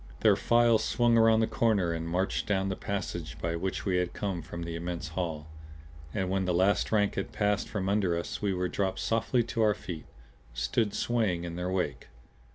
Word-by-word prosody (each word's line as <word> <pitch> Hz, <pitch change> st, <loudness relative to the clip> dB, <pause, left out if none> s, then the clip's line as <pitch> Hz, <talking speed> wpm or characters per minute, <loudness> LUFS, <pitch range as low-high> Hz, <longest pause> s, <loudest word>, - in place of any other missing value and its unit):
Their -, -, +6 dB
files 120 Hz, -1 st, +3 dB
swung 120 Hz, -1 st, +2 dB
around 115 Hz, 0 st, +5 dB
the -, -, +4 dB
corner 105 Hz, -7 st, +1 dB
and 80 Hz, 0 st, -4 dB
marched 95 Hz, +5 st, -1 dB
down 95 Hz, -2 st, +1 dB
the 95 Hz, -, -1 dB
passage 90 Hz, -5 st, -4 dB
by 85 Hz, 0 st, -1 dB
which 95 Hz, +3 st, -3 dB
we 95 Hz, -3 st, +2 dB
had 90 Hz, -1 st, -1 dB
come 95 Hz, -4 st, -3 dB
from 85 Hz, 0 st, -7 dB
the 85 Hz, 0 st, -5 dB
immense 85 Hz, -1 st, -4 dB
hall. 80 Hz, -3 st, -3 dB, 0.7 s
And 95 Hz, +4 st, -1 dB
when 95 Hz, 0 st, 0 dB
the 90 Hz, -1 st, +1 dB
last 95 Hz, +3 st, +2 dB
rank 105 Hz, -2 st, +2 dB
had 95 Hz, -, -3 dB
passed 105 Hz, -1 st, 0 dB
from 95 Hz, -3 st, -2 dB
under 95 Hz, -4 st, +2 dB
us 85 Hz, -, -4 dB
we 100 Hz, -2 st, +1 dB
were 90 Hz, -1 st, 0 dB
dropped 95 Hz, +1 st, -1 dB
softly 115 Hz, +2 st, +1 dB
to 115 Hz, 0 st, -2 dB
our 105 Hz, -1 st, +4 dB
feet; 85 Hz, -4 st, -7 dB, 0.5 s
stood 80 Hz, -, 0 dB
swaying 110 Hz, -8 st, 0 dB
in 85 Hz, -1 st, -5 dB
their 90 Hz, +1 st, -2 dB
wake. 90 Hz, -6 st, -2 dB
95 Hz, 200 wpm, -29 LUFS, 85-105 Hz, 0.7 s, Their